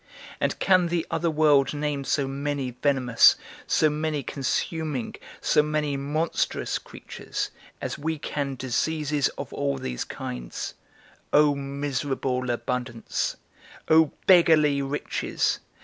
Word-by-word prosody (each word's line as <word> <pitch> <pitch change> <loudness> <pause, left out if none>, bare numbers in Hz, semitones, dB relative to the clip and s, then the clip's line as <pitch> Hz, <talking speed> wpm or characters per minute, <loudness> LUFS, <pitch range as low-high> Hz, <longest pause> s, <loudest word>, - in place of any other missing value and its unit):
And - - 0
can 185 -2 +4
the 170 -1 -1
other 170 - +1
world 150 -2 +3
name 145 -1 -2
so 135 +1 +1
many 140 -1 -2
venomous, 125 -2 +4 0.3
so 155 - +4
many 150 -1 -1
consuming, 145 0 -2 0.3
so - - +4
many 150 -1 -1
monstrous 150 +4 -1
creatures, - - -6 0.3
as - - -4
we 160 +2 -2
can 140 -2 -3
diseases 145 +3 0
of - - -6
all 140 -1 -1
these 60 - -3
kinds? - - -6 0.6
O 150 0 +5
miserable 140 -2 -2
abundance, 120 -1 -2 0.5
O 160 0 +7 0.2
beggarly 155 -6 +5
riches! 140 +2 -1
145 Hz, 115 wpm, -26 LUFS, 135-155 Hz, 0.6 s, O